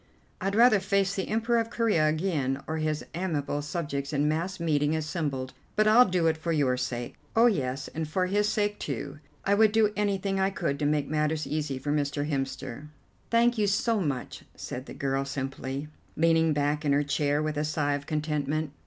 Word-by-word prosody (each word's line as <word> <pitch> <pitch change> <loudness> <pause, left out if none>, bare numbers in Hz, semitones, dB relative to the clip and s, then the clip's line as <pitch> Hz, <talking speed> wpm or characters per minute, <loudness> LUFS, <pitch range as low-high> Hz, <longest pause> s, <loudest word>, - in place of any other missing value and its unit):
"I'd 195 +2 -1
rather 235 -2 +6
face 195 0 +1
the 190 -2 -2
Emperor 230 +2 +1
of 230 0 -2
Corea 220 -10 +2
again, 155 -5 -1
or 160 - -3
his 155 -1 -1
amiable 155 -5 -2
subjects 145 -2 -3
in 145 0 +1
mass 170 +5 -1
meeting 150 -2 +1
assembled, 150 -5 -3 0.2
but 215 - +3
I'll 230 +3 +7
do 180 -2 +1
it 160 -1 +2
for 165 +1 -3
your 140 -5 +2
sake. 125 -1 -3 0.2
Oh, 230 +1 +6
yes, 135 - 0
and 160 0 -4
for 185 +4 0
his 205 +3 +1
sake, 205 -1 0
too; 140 +1 -5 0.3
I 200 - +3
would 215 +1 +5
do 215 -1 +3
anything 200 -1 0
I 190 0 +3
could 140 -7 -2
to 145 - +1
make 145 -1 +1
matters 155 0 0
easy 150 -3 -2
for 145 +3 -3
Mr. 145 0 0
Hemster." 135 -1 -4 0.4
"Thank 235 0 +3
you 205 - +3
so 215 +2 +1
much," 140 -7 -3
said 130 +2 -6
the - - -8
girl 135 0 -1
simply, 135 +1 -4 0.3
leaning 165 0 +4
back 145 +1 0
in 145 -2 +2
her 145 +1 +3
chair 145 0 +1
with 155 0 -2
a 150 - 0
sigh 150 -1 0
of 145 0 -4
contentment. 150 -1 -1
155 Hz, 195 wpm, -28 LUFS, 145-195 Hz, 0.4 s, I'll